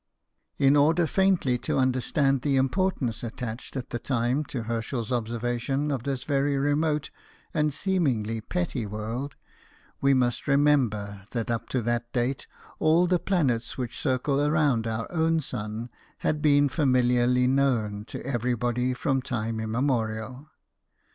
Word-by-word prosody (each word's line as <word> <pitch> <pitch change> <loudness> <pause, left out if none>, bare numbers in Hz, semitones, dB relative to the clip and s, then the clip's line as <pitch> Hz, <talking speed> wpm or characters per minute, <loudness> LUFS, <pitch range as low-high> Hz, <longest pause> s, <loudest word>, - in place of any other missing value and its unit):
In 140 0 +4
order 160 +4 +4
faintly 175 -8 +2
to - - -1
understand 130 +1 +2
the 140 0 +1
importance 135 - 0
attached 120 +2 -5
at 125 - -6
the 120 - -2
time 125 +3 0
to 125 -4 -4
Herschel's 115 +1 -3
observation 120 +4 -1
of 135 -4 -1
this 135 -2 -2
very 140 0 +1
remote 150 +1 0 0.4
and 150 -1 +1
seemingly 130 - 0
petty 150 -5 -2
world, 115 +7 -4 0.7
we: 140 0 +4
must 125 -2 0
remember 120 -9 +2
that 115 -1 -1
up 115 - -3
to 125 -3 -1
that 120 +1 -1
date 125 +1 -1 0.3
all 160 +3 +4
the 180 0 +2
planets 140 - 0
which 125 -2 -4
circle 140 +2 +1
round 145 -7 +2
our 115 0 -2
own 165 -1 +2
sun 115 -3 -5 0.3
had 150 -1 -1
been 145 -1 +4
familiarly 125 -3 +2
known 125 -6 +1
to - - -8
everybody 125 0 0
from 135 0 0
time 115 -3 -3
immemorial. 115 +2 -2
130 Hz, 135 wpm, -26 LUFS, 115-145 Hz, 0.7 s, In